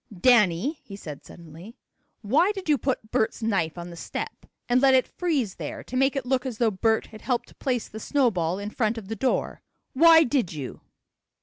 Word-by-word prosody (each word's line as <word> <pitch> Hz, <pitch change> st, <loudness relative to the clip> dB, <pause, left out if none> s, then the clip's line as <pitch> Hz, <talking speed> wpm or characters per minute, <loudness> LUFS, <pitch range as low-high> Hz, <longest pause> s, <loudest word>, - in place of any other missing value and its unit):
"Danny," 240 Hz, -, +3 dB
he 200 Hz, -, -10 dB
said 150 Hz, -7 st, -9 dB
suddenly, 170 Hz, +7 st, -13 dB, 0.5 s
"why 295 Hz, -, +3 dB
did 385 Hz, -3 st, -7 dB
you 300 Hz, -, +4 dB
put 250 Hz, -5 st, -2 dB
Bert's 220 Hz, +1 st, 0 dB
knife 185 Hz, -7 st, 0 dB
on 175 Hz, 0 st, -7 dB
the -, -, -9 dB
step, 165 Hz, -, -6 dB, 0.2 s
and 245 Hz, +1 st, +3 dB
let 270 Hz, -1 st, +6 dB
it 255 Hz, -, +3 dB
freeze 285 Hz, -, -1 dB
there -, -, -6 dB
to 255 Hz, -, -8 dB
make 270 Hz, +2 st, +2 dB
it 270 Hz, -3 st, -2 dB
look 255 Hz, 0 st, 0 dB
as 255 Hz, -4 st, -5 dB
though 230 Hz, -2 st, +2 dB
Bert 220 Hz, +3 st, +1 dB
had 215 Hz, -, -13 dB
helped 245 Hz, -2 st, -3 dB
place 250 Hz, -4 st, -1 dB
the 220 Hz, -, -9 dB
snowball 200 Hz, -, +1 dB
in 205 Hz, +1 st, -5 dB
front 225 Hz, -1 st, 0 dB
of 205 Hz, -3 st, -8 dB
the 225 Hz, -, -3 dB
door? 255 Hz, +4 st, -1 dB, 0.3 s
Why 325 Hz, +3 st, +7 dB
did 250 Hz, -, 0 dB
you?" 140 Hz, -5 st, -7 dB
230 Hz, 200 wpm, -25 LUFS, 195-265 Hz, 0.5 s, Why